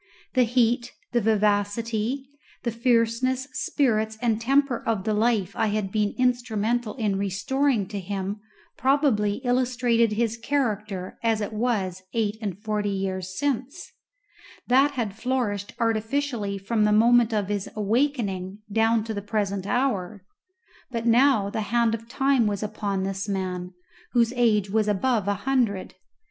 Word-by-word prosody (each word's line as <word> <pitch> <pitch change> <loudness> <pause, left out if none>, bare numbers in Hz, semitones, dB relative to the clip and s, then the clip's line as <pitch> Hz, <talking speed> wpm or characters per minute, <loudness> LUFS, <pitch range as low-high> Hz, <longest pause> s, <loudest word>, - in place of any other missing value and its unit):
The 255 -2 +4
heat, 240 0 +1 0.2
the 240 - +2
vivacity, 215 +4 0 0.4
the 235 - -1
fierceness, 240 +2 +1
spirits, 220 -6 0
and 230 -2 0
temper 270 0 +2
of 220 -4 0
the 215 - 0
life 210 -3 +1
I 225 - +1
had 205 -2 -1
been 210 -1 0
instrumental 240 -2 0
in 210 -6 -1
restoring 205 +4 0
to 205 -1 -4
him 195 +2 -4 0.4
probably 260 -7 +2
illustrated 245 -2 +2
his 230 0 0
character 215 -7 -2
as 225 -2 +1
it 210 +1 -4
was 210 -5 -1
eight 215 -2 +1
and 200 -4 -3
forty 210 -1 -1
years 190 -1 -3
since; 280 +3 -2 0.7
that 270 +4 +4
had 230 -6 -2
flourished 220 -5 -2
artificially 225 -1 -1
from 210 +3 0
the 210 - +3
moment 235 +2 +5
of 205 -3 -1
his 205 -2 -2
awakening 210 -4 0
down 225 +1 +3
to 220 0 -4
the 205 - -4
present 200 -2 -2
hour; 210 -7 -1 0.6
but 230 -2 -3
now 235 -4 +4
the 220 - -2
hand 235 -1 +2
of 230 0 -5
Time 270 -3 +2
was 205 0 -2
upon 200 -2 -2
this 195 +1 -3
man, 185 -2 -3 0.4
whose 235 -1 +3
age 220 -5 +3
was 215 +2 +1
above 210 0 +1
an 205 - +2
hundred. 230 -4 0
220 Hz, 145 wpm, -25 LUFS, 205-245 Hz, 0.7 s, moment